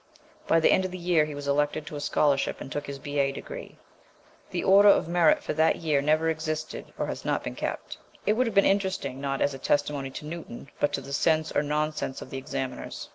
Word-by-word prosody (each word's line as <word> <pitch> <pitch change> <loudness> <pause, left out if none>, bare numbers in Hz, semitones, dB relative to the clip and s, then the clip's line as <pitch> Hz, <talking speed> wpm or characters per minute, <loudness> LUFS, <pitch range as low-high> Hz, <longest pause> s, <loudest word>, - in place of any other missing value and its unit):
By 165 - +4
the 160 - +4
end 190 - +4
of 185 - -2
the 185 - -6
year 170 -3 +2
he 150 -1 -7
was 145 0 -6
elected 145 +2 +1
to 150 - -7
a - - -4
scholarship 145 -1 +1
and 135 - -8
took 145 +1 -4
his 140 0 -5
B.A. 140 -1 0
degree. - - -8 0.7
The - - -2
order 200 +2 +7
of 200 - +4
merit 170 -2 +3
for - - -2
that 160 +1 +3
year 155 -4 +1
never 155 +3 +2
existed 155 -1 -3
or - - -1
has - - -5
not - - -1
been - - -4
kept. - - -5 0.3
It 210 - +4
would 250 +3 +1
have 225 - -4
been 200 - +6
interesting, 190 -9 0
not 135 -1 -2
as 140 - +2
a 135 - -7
testimony 145 -1 0
to 135 - -8
Newton, 155 -5 -8
but 145 - +2
to - - -1
the 140 +1 -8
sense 155 +2 +2
or - - +2
non 150 +1 0
sense 135 -3 -4
of - - -10
the 135 - -4
examiners. 135 -1 -5
150 Hz, 235 wpm, -27 LUFS, 140-165 Hz, 0.7 s, order